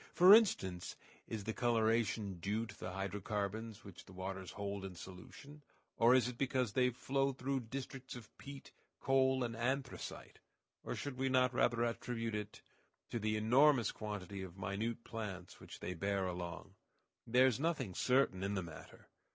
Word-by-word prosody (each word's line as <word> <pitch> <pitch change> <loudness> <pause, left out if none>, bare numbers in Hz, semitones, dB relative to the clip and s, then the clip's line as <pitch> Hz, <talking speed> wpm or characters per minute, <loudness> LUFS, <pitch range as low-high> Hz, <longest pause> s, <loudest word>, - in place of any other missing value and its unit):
For 185 +3 +10
instance, 95 - +3 0.3
is 110 -2 -4
the 110 +2 -2
coloration 110 -5 +1
due 105 +6 -1
to - - -11
the 90 - -4
hydrocarbons 105 +3 -3
which 100 -4 -11
the 95 - -14
waters 95 0 -5
hold 100 -1 -4
in 95 -2 -6
solution, 115 - -11 0.3
or 120 +2 +6
is 130 -2 +4
it 125 -1 -6
because 130 -5 +1
they 125 -1 +4
flow 135 +3 0
through 135 +1 -1
districts 130 +2 -6
of 115 -3 -11
peat, 140 0 -9 0.3
coal, 130 -1 +3
and 115 -1 -3
anthracite; 130 +3 -3 0.4
or - - -3
should 140 -3 -5
we 135 0 +1
not 130 -1 +3
rather 120 -1 +2
attribute 115 -1 -2
it 105 0 -5 0.5
to 120 - -1
the 110 0 0
enormous 125 +3 +5
quantity 100 -2 -5
of 95 -1 -8
minute 100 +5 -3
plants 95 -6 -6
which - - -11
they 90 - -3
bear 100 +2 0
along? 90 -1 -5 0.5
There 125 +3 +6
is 130 -3 +2
nothing 150 - -1
certain 125 -4 +2
in 100 +1 -1
the 95 - -1
matter. 85 -1 -11
115 Hz, 165 wpm, -36 LUFS, 100-130 Hz, 0.5 s, For